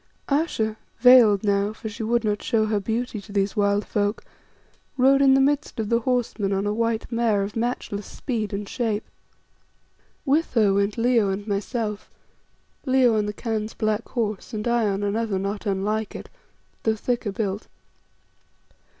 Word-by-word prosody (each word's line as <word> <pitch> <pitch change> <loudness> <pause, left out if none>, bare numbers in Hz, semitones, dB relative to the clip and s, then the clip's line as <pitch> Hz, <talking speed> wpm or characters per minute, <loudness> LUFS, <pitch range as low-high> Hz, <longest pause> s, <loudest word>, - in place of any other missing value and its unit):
Ayesha, 275 -8 0 0.2
veiled 240 -6 +7
now 200 0 +1
for 220 - -8
she 215 +1 -7
would 235 +1 +1
not 210 -1 -1
show 225 -4 +1
her 215 -1 0
beauty 225 +1 -3
to 205 - -14
these 200 -1 0
wild 200 0 +1
folk 205 +1 -1 0.7
rode 270 +2 +5
in 270 -1 +6
the - - +4
midst 285 -1 +1
of 215 -2 -2
the 235 - +3
horse 245 -1 -1
men 200 -1 0
on 195 +1 0
a 205 - 0
white 230 +1 -1
mare 230 -4 +1
of 200 +1 -6
matchless 225 -3 -3
speed 225 -6 -3
and 200 0 -4
shape. 220 -2 -2 1.2
With 295 +1 +1
her 210 -4 +4
went 200 +2 0
Leo 230 -3 +3
and 195 +1 -3
myself, 210 +1 -3 0.7
Leo 255 -4 +3
on 210 -1 +1
the - - -1
Khan's 220 -1 -3
black 215 +1 -1
horse, 215 -3 -3
and 215 +2 -3
I 235 -2 +2
on 195 +1 -2
another 210 0 -1
not 200 +2 -3
unlike 205 +2 -1
it, - - -8 0.5
though 220 -1 +1
thicker 235 -1 -2
built. 205 -1 -3
215 Hz, 165 wpm, -24 LUFS, 205-235 Hz, 1.2 s, veiled